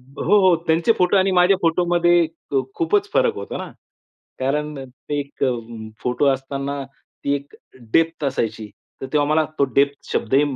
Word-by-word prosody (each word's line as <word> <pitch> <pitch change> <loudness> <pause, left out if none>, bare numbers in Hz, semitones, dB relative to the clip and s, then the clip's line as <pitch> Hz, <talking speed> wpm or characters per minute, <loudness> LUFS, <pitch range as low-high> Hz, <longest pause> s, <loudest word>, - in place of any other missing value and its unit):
हो, 140 +10 +1
हो. 175 - +5
त्यांचे 165 +7 +3
फोटो 180 +2 +3
आणि 190 0 +3
माझ्या 180 +2 +5
फोटोमध्ये 175 +1 +3 0.3
अ, - - +1 0.2
खूपच 410 +4 +1
फरक - - +2
होता - - -6
ना. - - -6 0.7
कारण 150 +3 -1
ते 130 +3 -6
एक 140 0 -4
अ, 130 - +2 0.5
फोटो 125 +3 0
असताना 140 +1 -1 0.4
ती 140 - +1
एक 140 0 -7 0.4
डेप्थ 165 -1 +2
असायची. 110 -5 -2 0.3
तर - - -4
तेव्हा 145 -1 +2
मला 155 +1 +3
तो 140 - +4
डेप्थ 140 0 +1
शब्दही 135 +5 +2
150 Hz, 160 wpm, -21 LUFS, 140-175 Hz, 0.7 s, हो